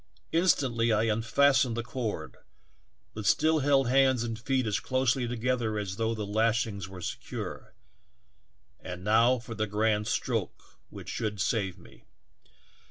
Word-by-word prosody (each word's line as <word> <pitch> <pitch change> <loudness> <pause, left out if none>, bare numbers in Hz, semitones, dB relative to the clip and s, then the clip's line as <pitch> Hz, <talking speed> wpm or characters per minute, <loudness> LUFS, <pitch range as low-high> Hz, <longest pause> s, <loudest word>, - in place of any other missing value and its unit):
Instantl}^ 130 -10 +2
I 110 - +2
unfastened 115 +3 +2
the 120 - -2
cord, 120 -3 -5 0.8
but 105 -2 -4
still 155 +6 +3
held 135 -2 +3
hands 130 -1 +3
and 115 -1 -4
feet 130 +1 0
as 105 -2 0
closely 130 -1 0
together 120 -2 -1
as 100 -2 -4
though 115 0 0
the 105 -1 -4
lashings 110 -2 0
were 95 -1 -9
secure. - - -6 1.0
And 90 0 -8
now 115 +5 +4
for 115 -1 -8
the 110 -1 -2
grand 105 0 0
stroke - - -3
which - - -10
should 105 -3 -3
save 95 -3 -1
me - - -18
115 Hz, 140 wpm, -29 LUFS, 105-130 Hz, 1.0 s, now